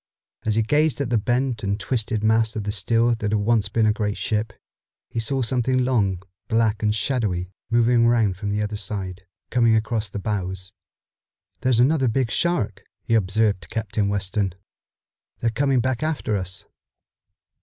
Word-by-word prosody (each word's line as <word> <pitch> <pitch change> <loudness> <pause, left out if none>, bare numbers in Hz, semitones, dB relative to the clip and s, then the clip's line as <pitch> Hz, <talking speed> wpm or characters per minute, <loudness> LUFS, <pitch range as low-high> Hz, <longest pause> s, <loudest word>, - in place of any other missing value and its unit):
As 110 - +2
he 110 - +3
gazed 150 +6 +2
at 135 -4 -2
the 115 - +3
bent 120 +1 0
and 100 +1 -1
twisted 110 -2 -2
mass 110 0 +3
of 105 -1 -2
steel 115 +4 +2
that 115 - -6
had - - +2
once 105 -1 +2
been 110 +2 +2
a 105 - +4
great 105 -2 -2
ship, 110 -1 -1 0.6
he 115 - -2
saw 130 +4 0
something 130 +2 +1
long, 100 -8 +1 0.3
black 115 -2 +1
and 105 -1 +1
shadowy 100 -6 -1 0.2
moving 120 0 +4
around 115 -5 +3
from 100 +2 -4
the 105 +1 0
other 105 0 -3
side, 95 -2 -5 0.2
coming 115 -2 +4
across 110 -1 -1
the 95 - -6
bows. 95 -2 -3 0.9
"There's 125 -2 +2
another 135 +1 +3
big 120 0 0
shark," 160 - 0 0.2
he - - -1
observed 105 -1 +2
to 80 - -14
Captain 105 -2 -1
Weston. 100 -1 -1 0.8
"They're 115 - +1
coming 135 +2 +2
back 130 +1 -1
after 155 -8 -1
us." 95 0 -4
110 Hz, 165 wpm, -23 LUFS, 100-120 Hz, 0.9 s, a